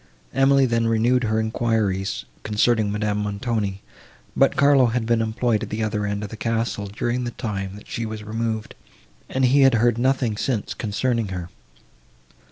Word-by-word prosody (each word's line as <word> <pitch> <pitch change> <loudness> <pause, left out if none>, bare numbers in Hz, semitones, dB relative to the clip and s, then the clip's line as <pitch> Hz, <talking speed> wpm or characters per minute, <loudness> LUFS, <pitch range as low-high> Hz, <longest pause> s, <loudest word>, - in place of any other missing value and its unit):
Emily 135 +1 +4
then 115 -2 +1
renewed 120 +2 +2
her 110 0 +1
enquiries, 110 -4 -1 0.2
concerning 105 0 +1
Madame 105 0 -1
Montoni, 105 -1 -2 0.5
but - - +3
Carlo 140 -3 +5
had 115 0 -1
been 115 0 +2
employed 115 0 0
at 110 - -5
the 110 +1 -2
other 105 -1 -1
end 100 0 -3
of 105 - -5
the - - -6
castle, 115 -3 -2
during 120 +5 -2
the 120 - -2
time, 100 -4 -4
that 105 - -13
she 115 - -4
was 110 -1 -6
removed, 110 0 -3 0.6
and 130 0 +1
he 135 +3 +4
had 135 -2 +6
heard 120 +1 +2
nothing 130 -4 +1
since, 115 -3 -2
concerning 115 +1 -1
her. 90 -2 -5
110 Hz, 170 wpm, -23 LUFS, 105-120 Hz, 0.6 s, had